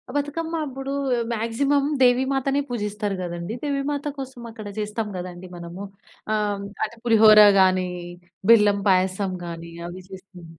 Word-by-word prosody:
బతుకమ్మ 320 Hz, +3 st, -2 dB
అప్పుడూ 270 Hz, 0 st, -6 dB, 0.4 s
మాగ్జిమమ్ 275 Hz, +6 st, +1 dB
దేవీమాతనే 265 Hz, +2 st, +3 dB
పూజిస్తారు 210 Hz, -3 st, -3 dB
గదండీ. 175 Hz, +3 st, -5 dB
దేవీమాత 285 Hz, 0 st, -2 dB
కోసం 265 Hz, -2 st, -7 dB
అక్కడ 215 Hz, -2 st, -9 dB
చేస్తాం 210 Hz, +1 st, -3 dB
గదండీ 180 Hz, 0 st, -7 dB
మనము. 175 Hz, +3 st, -8 dB, 0.5 s
ఆహ్, 205 Hz, -2 st, -1 dB, 0.2 s
అంటే, 220 Hz, +2 st, -4 dB
పులిహోరా 215 Hz, -2 st, +8 dB
గానీ, 185 Hz, -1 st, +3 dB, 0.6 s
బెల్లం 210 Hz, -3 st, +6 dB
పాయసం 190 Hz, +1 st, +2 dB
గానీ, 170 Hz, 0 st, -7 dB, 0.2 s
అవి 180 Hz, +2 st, -8 dB
చేస్తం. 190 Hz, -2 st, -12 dB
210 Hz, 120 wpm, -23 LUFS, 185-265 Hz, 0.6 s, పులిహోరా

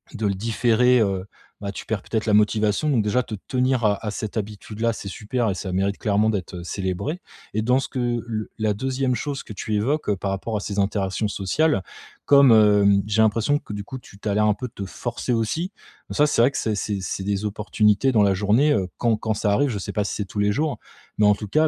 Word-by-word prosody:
de 110 Hz, -, -2 dB
le 100 Hz, -, +1 dB
différer, 115 Hz, +4 st, +3 dB
heu, 95 Hz, -2 st, 0 dB, 0.4 s
bah, 100 Hz, -1 st, -3 dB
tu -, -, -8 dB
perds 110 Hz, -2 st, -2 dB
peut-être 110 Hz, -1 st, -2 dB
la 105 Hz, -, +1 dB
motivation 105 Hz, +6 st, +2 dB
donc 120 Hz, -6 st, +3 dB
déjà 120 Hz, +4 st, +1 dB
te 110 Hz, -, -6 dB
tenir 130 Hz, -2 st, +1 dB
à 105 Hz, +1 st, +1 dB
à 105 Hz, -, -1 dB
cette 110 Hz, 0 st, -5 dB
habitude 105 Hz, +1 st, -5 dB
là, 115 Hz, 0 st, +3 dB
c'est 105 Hz, -, -7 dB
super 110 Hz, +3 st, -2 dB
et -, -, 0 dB
ça 95 Hz, 0 st, -5 dB
mérite 100 Hz, +2 st, 0 dB
clairement 105 Hz, +1 st, +2 dB
d'être, 95 Hz, -3 st, -3 dB
heu, 85 Hz, -, -7 dB
célébré. 95 Hz, -, -3 dB, 0.3 s
Et 110 Hz, -, 0 dB
dans 125 Hz, +4 st, +3 dB
ce -, -, -4 dB
que 120 Hz, -2 st, -1 dB
le 110 Hz, -2 st, -4 dB
la 110 Hz, -1 st, +1 dB
2e 130 Hz, +3 st, -1 dB
chose 140 Hz, 0 st, -4 dB
que 105 Hz, -, -9 dB
tu 105 Hz, +2 st, -4 dB
évoques, 135 Hz, +6 st, 0 dB
heu, 100 Hz, -, +1 dB
par 95 Hz, +1 st, -2 dB
rapport 105 Hz, +3 st, -3 dB
à -, -, -2 dB
ces 100 Hz, 0 st, -5 dB
interactions 100 Hz, 0 st, 0 dB
sociales. 100 Hz, -, +1 dB, 0.4 s
Comme, 140 Hz, -3 st, +7 dB
hem, 105 Hz, -2 st, +5 dB
j'ai 105 Hz, +1 st, +2 dB
l'impression 115 Hz, +7 st, +2 dB
que -, -, -12 dB
du 100 Hz, -1 st, -4 dB
coup 130 Hz, -, -7 dB
tu 100 Hz, -5 st, -15 dB
tu 110 Hz, -, -6 dB
as -, -, +1 dB
l'air 105 Hz, +1 st, +3 dB
un 105 Hz, -, +4 dB
peu 125 Hz, +4 st, -5 dB
de -, -, -19 dB
te 100 Hz, -, -5 dB
forcer 120 Hz, +4 st, -3 dB
aussi, 160 Hz, -, -1 dB, 0.4 s
ça 150 Hz, -, +3 dB
c'est 115 Hz, -, +2 dB
vrai 130 Hz, +4 st, +5 dB
que -, -, -4 dB
c'est 110 Hz, -2 st, -1 dB
c'est 100 Hz, 0 st, -2 dB
c'est 95 Hz, -, -4 dB
des 100 Hz, +1 st, -1 dB
opportunités 105 Hz, +3 st, +2 dB
dans 105 Hz, -4 st, +4 dB
la 100 Hz, -1 st, +3 dB
journée, 105 Hz, +10 st, +3 dB
heu, 95 Hz, -3 st, 0 dB
quand 115 Hz, -2 st, +2 dB
quand 110 Hz, 0 st, -1 dB
ça 105 Hz, 0 st, 0 dB
arrive, 140 Hz, +6 st, +2 dB
je 105 Hz, -, -3 dB
sais -, -, -5 dB
pas 105 Hz, -, 0 dB
si -, -, -3 dB
c'est 105 Hz, -, -3 dB
tous 105 Hz, -, -6 dB
les 105 Hz, 0 st, +3 dB
jours, 150 Hz, +5 st, -1 dB, 0.4 s
mais 105 Hz, -, +4 dB
en 105 Hz, 0 st, +5 dB
tout 105 Hz, 0 st, -7 dB
cas 155 Hz, +5 st, +3 dB
105 Hz, 255 wpm, -23 LUFS, 100-120 Hz, 0.4 s, Comme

